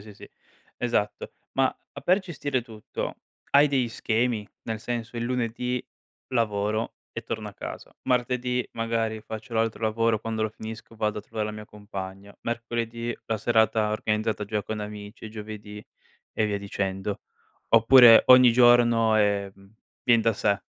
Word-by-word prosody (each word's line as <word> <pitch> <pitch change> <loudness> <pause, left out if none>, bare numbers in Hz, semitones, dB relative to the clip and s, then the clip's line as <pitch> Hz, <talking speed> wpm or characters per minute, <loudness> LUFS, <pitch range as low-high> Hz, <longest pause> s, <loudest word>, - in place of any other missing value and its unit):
sì, 105 0 -12
sì. - - -13 0.5
Esatto. 120 -4 -1 0.2
Ma 135 0 +3 0.3
a 140 - -8
per 180 +7 +3
gestire 145 -8 -3
tutto 110 -3 -6 0.3
hai 145 +1 +6
degli 130 -4 +1
schemi? 115 -1 -1
Nel 110 -2 -4
senso: 120 0 -4
"Il 115 - -2
lunedì 125 0 -2 0.4
lavoro 110 -2 -1 0.2
e - - -5
torno - - -5
a - - -10
casa, - - -8
martedì 125 0 0
magari, 115 -1 -1
faccio 110 +2 -8
l'altro 115 0 0
lavoro, 110 0 +1
quando 110 0 -3
lo 110 - +1
finisco 110 +1 -9
vado 105 -1 -1
a - - -4
trovare 105 0 -4
la 105 - -4
mia 105 0 -8
compagna, 100 -1 -8
mercoledì 115 0 -3
la 110 - 0
serata 110 -1 +2
organizzata 110 0 -1
già 105 0 -2
con 110 0 -4
amici, 105 0 -8
e - - -5
giovedì..." 105 -1 -8 0.5
e 110 - +2
via 100 -1 -1
dicendo. 100 0 -3 0.5
Oppure 115 0 +8
ogni 125 -2 +8
giorno, 120 -2 +5
ehm, 100 -1 -1 0.3
vien 120 -2 +5
da 115 +1 +2
sé. 100 -1 0
110 Hz, 155 wpm, -26 LUFS, 105-120 Hz, 0.5 s, Oppure